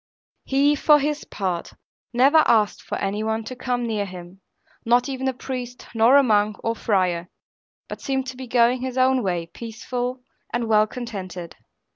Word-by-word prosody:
He, 280 +2 +3
for 295 +1 +5
his 295 +1 -2
part, 185 -4 -3 0.4
never 270 +6 +5
asked 215 -3 +3
for - - -4
any 200 +2 -2
one 220 +1 -1
to 255 +4 -7
come 245 -1 -2
near 215 -3 -1
him, 180 +1 -11 0.4
not 240 +3 +3
even 265 -1 -3
a - - +2
priest, 250 -1 -6
nor 230 +4 +6
a 280 - +6
monk 210 -3 +2
or 230 0 0
friar; 185 -6 0 0.6
but - - -8
seemed 265 -2 -1
to 260 - -7
be 260 0 -8
going 240 +1 +3
his 260 0 -4
own 260 0 +3
way, 175 -5 -1
peaceful, 245 +5 -5 0.3
and 240 -1 -1
well 215 -1 +4
contented. 190 -8 -7
235 Hz, 170 wpm, -23 LUFS, 205-255 Hz, 0.6 s, nor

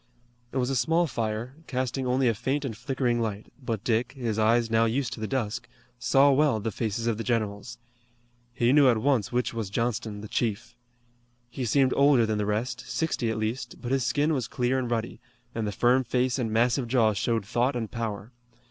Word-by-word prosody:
It - - -4
was 125 +1 0
a - - 0
small 165 +8 +2
fire, 115 -2 -3
casting 130 0 -2
only 130 +1 +2
a 115 - +3
faint 135 +6 -2
and 115 -5 -4
flickering 125 0 -1
light, 105 -2 -4
but 115 -4 -3
Dick, 115 +1 0
his 115 -5 -2
eyes 115 +1 +3
now 115 0 +4
used 120 +2 -1
to - - -8
the 110 - -3
dusk, 115 -5 -2 0.3
saw 135 +4 +4
well 140 -4 +3
the 110 +2 -3
faces 110 +2 -2
of 115 -2 0
the - - -2
generals. 110 -1 -2 0.7
He 120 +1 +2
knew 145 -3 +6
at 120 - +3
once 120 -3 +1
which 120 -1 0
was 115 -4 -3
Johnston, 110 -1 -2
the 110 - -7
chief. 115 +2 -2 0.8
He 130 +1 -3
seemed 130 +3 +3
older 140 -4 +5
than 110 -1 -1
the 105 - -1
rest, 120 +4 -2
sixty 155 -8 -1
at 110 - -2
least, 110 +4 -3
but 120 - -5
his 135 -1 +2
skin 145 +6 +1
was 130 -6 -1
clear 130 +1 0
and 125 -2 -3
ruddy, 115 -1 -3 0.3
and 115 -2 -2
the - - -2
firm 125 +6 +3
face 125 +2 0
and 115 -3 -1
massive 120 +3 +2
jaw 115 -3 +3
showed 110 +1 -1
thought 120 +5 0
and 115 -3 -3
power. 110 -1 -4
120 Hz, 205 wpm, -27 LUFS, 110-130 Hz, 0.8 s, knew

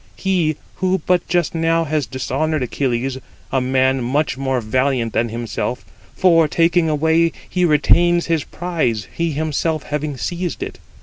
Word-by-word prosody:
He, 175 -5 0 0.2
who 185 -2 0
but 180 -1 +2
just 175 -3 +1
now 165 0 +2
has 155 -2 -1
dishonoured 135 +3 -1
Achilles, 130 +1 -1 0.3
a 130 - +1
man 130 0 +2
much 130 +1 0
more 135 -1 -1
valiant 120 0 0
than 120 0 +1
himself; 120 +2 -4 0.3
for, 165 -4 +4
taking 165 +1 +2
away, 160 +2 +2 0.2
he 180 0 +1
retains 170 +2 +3
his 165 -3 0
prize, 155 - -2
he 170 -2 -1
himself 155 +1 -1
having 150 -1 -3
seized 175 +6 -3
it. - - -7
155 Hz, 145 wpm, -19 LUFS, 130-170 Hz, 0.3 s, for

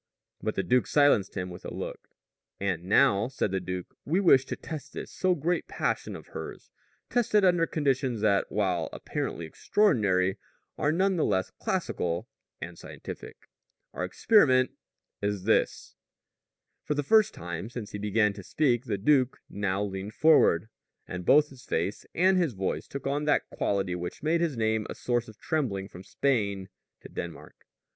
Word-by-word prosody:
But - - -2
the - - 0
duke 125 0 +2
silenced 145 -10 +3
him 90 -1 -3
with 90 - -10
a - - -6
look. - - -6 0.5
"And 95 -3 -2
now," 100 +2 +4
said 130 -6 -2
the 95 - 0
duke, 90 0 -6
"we 170 +6 +1
wish 135 -9 +5
to - - -4
test 150 -3 -8
this - - -6
so 185 -1 +1
great 170 +4 -1
passion - - -2
of - - -11
hers - - -8 0.4
test 240 -3 0
it 205 -2 +6
under 175 -2 +4
conditions 135 -6 0
that 100 -2 +2
while 90 -5 0
apparently 85 - -4
extraordinary 95 - +2 0.4
are 150 - +1
none 190 +3 +2
the 160 - +2
less 95 0 0
classical 85 0 -2 0.3
and - - -8
scientific. - - -9 0.5
Our 90 - -3
experiment 130 - +4 0.5
is 100 -2 -1
this 110 +2 +1 0.5
" - - -56
For 150 - -1
the 145 - 0
first 215 +7 +4
time 85 +4 -5
since 120 -3 -7
he 105 - -5
began 105 0 +2
to 100 - -9
speak 125 - +1
the 105 -3 -1
duke 130 +4 +3
now 100 -1 -1
leaned 100 +1 -5
forward, 145 - +5 0.4
and 90 0 -6
both 150 +1 +6
his 130 -2 -14
face 90 +5 -2
and 185 +2 +4
his 165 -8 +1
voice 95 -1 -3
took 140 - -7
on 145 +2 -1
that 150 - +2
quality 95 -3 -1
which 90 +8 -5
made 165 +2 +2
his 160 -7 0
name 110 -1 0
a - - -5
source 120 -1 -1
of 110 -2 -13
trembling 110 -13 -2
from 90 - -11
Spain 100 -7 0 0.3
to - - -10
Denmark. - - -8
110 Hz, 170 wpm, -28 LUFS, 95-150 Hz, 0.5 s, it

